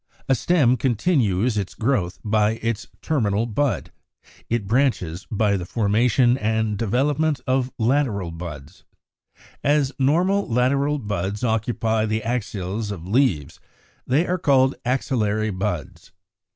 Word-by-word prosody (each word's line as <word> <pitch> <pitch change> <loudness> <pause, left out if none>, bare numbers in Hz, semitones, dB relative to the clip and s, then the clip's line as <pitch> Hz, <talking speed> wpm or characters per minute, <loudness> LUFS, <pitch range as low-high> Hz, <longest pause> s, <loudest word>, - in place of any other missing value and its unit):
A 135 - +4
stem 130 0 +3
continues 120 - +1
its 95 - -5
growth 110 -8 0
by 105 0 +2
its 115 -2 -2 0.2
terminal 110 -8 +1
bud; 120 +4 -1 0.6
it 115 -3 0
branches 95 - 0
by 105 -1 +1
the 90 - -4
formation 120 +4 +2
and 110 0 0
development 140 +7 0
of 130 -1 0
lateral 115 -7 0
buds. 80 -1 -9 0.8
As 145 -2 +2
normal 180 +9 +2
lateral 135 +5 +1
buds 105 -3 -3
occupy 110 -1 0
the 110 0 -1
axils 105 -3 -3
of 90 -4 -6
leaves, 95 - +1 0.5
they 145 +7 +2
are 180 +1 -1
called 135 -4 +3
axillary 110 -4 0
buds. 95 -6 -4
115 Hz, 120 wpm, -23 LUFS, 105-135 Hz, 0.8 s, A